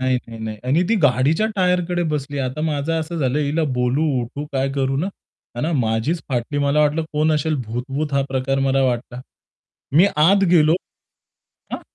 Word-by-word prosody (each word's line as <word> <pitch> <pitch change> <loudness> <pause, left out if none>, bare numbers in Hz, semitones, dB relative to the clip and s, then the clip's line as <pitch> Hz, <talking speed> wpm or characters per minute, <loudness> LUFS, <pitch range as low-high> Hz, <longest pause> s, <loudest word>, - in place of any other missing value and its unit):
नाही, 130 0 +2
नाही, 115 -1 -9
नाही. 110 -1 -5
आणि 155 +7 +3
ती 230 - +3
गाडीच्या 145 - +3
टायरकडे 180 -1 +1
बसली. 145 -1 -3
आता 130 +3 -3
माझं 155 0 -1
असं 170 +2 -5
झालं, 135 0 0
हिला 150 +2 0
बोलू, 125 +5 +1 0.2
उठू 140 +5 -6
काय 135 0 0
करू 135 -1 0
ना? 175 +7 -1 0.5
आणि 155 +7 -1
माझीच 115 +9 0
फाटली. 130 +3 -2
मला 145 +1 +2
वाटलं 150 +2 +2
कोण 155 +1 +2
असेल 155 +1 0
भूत-वूत 135 +6 -3
हा 140 - +2
प्रकार 135 +1 -1
मला 135 0 +2
वाटला. 125 -1 -2 0.8
मी 180 +5 +7
आत 195 +6 +5
गेलो. 160 -2 +5 1.0
हां. - - -3
145 Hz, 170 wpm, -21 LUFS, 130-160 Hz, 1.0 s, मी